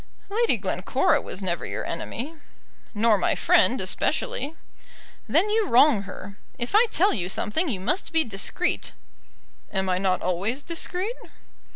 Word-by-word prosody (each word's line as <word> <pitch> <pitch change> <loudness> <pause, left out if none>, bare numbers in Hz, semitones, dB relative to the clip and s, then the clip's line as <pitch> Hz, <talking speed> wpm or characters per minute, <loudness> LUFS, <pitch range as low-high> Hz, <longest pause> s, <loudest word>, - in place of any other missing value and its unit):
"Lady 455 +3 +2
Glencora - - +1
was 195 - -6
never 175 -2 -2
your - - -4
enemy." 245 - -5 0.6
"Nor 215 -1 +3
my - - +1
friend, - - +4
especially." - - -2 0.7
"Then 415 - +3
you 435 -1 +2
wrong 250 - +5
her. 200 +2 -9 0.2
If 240 +7 -4
I 445 +4 +6
tell 390 +4 +3
you 180 -4 -1
something 315 - 0
you 205 -7 -2
must 240 - -1
be 325 -1 +3
discreet." 225 - -2 0.8
"Am 190 -1 -1
I 180 0 +1
not 185 -1 0
always 200 +10 -1
discreet?" 360 +6 -3
245 Hz, 145 wpm, -25 LUFS, -, 0.8 s, I